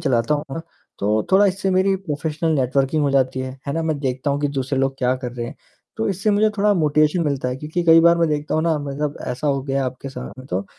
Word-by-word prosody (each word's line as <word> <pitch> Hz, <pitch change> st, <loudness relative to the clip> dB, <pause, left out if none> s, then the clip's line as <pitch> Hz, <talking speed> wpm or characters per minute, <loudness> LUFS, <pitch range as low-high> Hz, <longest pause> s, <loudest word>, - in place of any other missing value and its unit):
चलाता 120 Hz, +3 st, +1 dB
हूँ 145 Hz, -, -3 dB
ना, 165 Hz, -, -3 dB, 0.4 s
तो 105 Hz, +2 st, 0 dB
थोड़ा 200 Hz, +1 st, +6 dB
इससे 190 Hz, 0 st, 0 dB
मेरी 190 Hz, +1 st, +3 dB
प्रोफ़ेशनल 155 Hz, +2 st, -2 dB
नेटवर्किंग 135 Hz, +4 st, +1 dB
हो 140 Hz, -, +2 dB
जाती 130 Hz, -1 st, +1 dB
है, 130 Hz, +1 st, -6 dB
है 140 Hz, -, -1 dB
ना? 165 Hz, +1 st, -1 dB
मैं 155 Hz, -2 st, -1 dB
देखता 130 Hz, +1 st, -1 dB
हूँ 140 Hz, +1 st, -1 dB
कि 145 Hz, -, +1 dB
दूसरे 135 Hz, +1 st, -1 dB
लोग 135 Hz, 0 st, +1 dB
क्या 125 Hz, 0 st, +2 dB
कर 120 Hz, -, -4 dB
रहे 120 Hz, -1 st, -4 dB
हैं, -, -, -8 dB, 0.4 s
तो 110 Hz, -, -1 dB
इससे 195 Hz, +3 st, 0 dB
मुझे 210 Hz, +1 st, +3 dB
थोड़ा 205 Hz, +1 st, +4 dB
मोटिवेशन 155 Hz, +1 st, +2 dB
मिलता 140 Hz, -3 st, -1 dB
है। 125 Hz, -, -3 dB
क्योंकि 155 Hz, +5 st, -3 dB
कई 165 Hz, 0 st, +7 dB
बार 170 Hz, +1 st, +5 dB
मैं 165 Hz, -1 st, +2 dB
देखता 150 Hz, 0 st, -2 dB
हूँ 160 Hz, -, +1 dB
ना, 165 Hz, -2 st, +1 dB
मतलब 145 Hz, +1 st, -3 dB
ऐसा 125 Hz, +4 st, -3 dB
हो 140 Hz, -1 st, +1 dB
गया 135 Hz, 0 st, -1 dB
है 135 Hz, -, 0 dB
आपके 130 Hz, +2 st, -5 dB
साथ 135 Hz, -, -7 dB
में 130 Hz, -, -10 dB
तो 95 Hz, +2 st, -1 dB
145 Hz, 260 wpm, -21 LUFS, 130-165 Hz, 0.4 s, कई